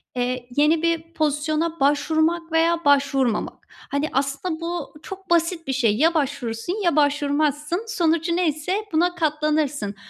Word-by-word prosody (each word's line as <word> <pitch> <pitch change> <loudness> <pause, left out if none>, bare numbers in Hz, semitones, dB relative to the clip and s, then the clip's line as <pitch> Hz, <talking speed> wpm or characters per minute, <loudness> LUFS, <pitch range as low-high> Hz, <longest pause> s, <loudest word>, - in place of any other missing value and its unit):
eee, 250 0 -2
yeni 310 +2 +3
bir 335 0 -1
pozisyona 310 +2 -1
başvurmak 315 +4 +1
veya 330 +1 +2
başvurmamak. 275 -5 +1 0.3
Hani, 285 +2 -1
aslında 280 +5 -2
bu 340 -3 -4
çok 385 -1 -9
basit 335 0 +1
bir 270 - -1
şey. 230 -5 +2
Ya 325 +6 +3
başvurursun 285 - -2
ya 345 -5 +2
başvurmazsın. 295 +4 +1
Sonucu 335 -3 +1
neyse 335 0 0 0.2
buna 350 +2 +2
katlanırsın 300 - -1
310 Hz, 130 wpm, -23 LUFS, 285-335 Hz, 0.3 s, yeni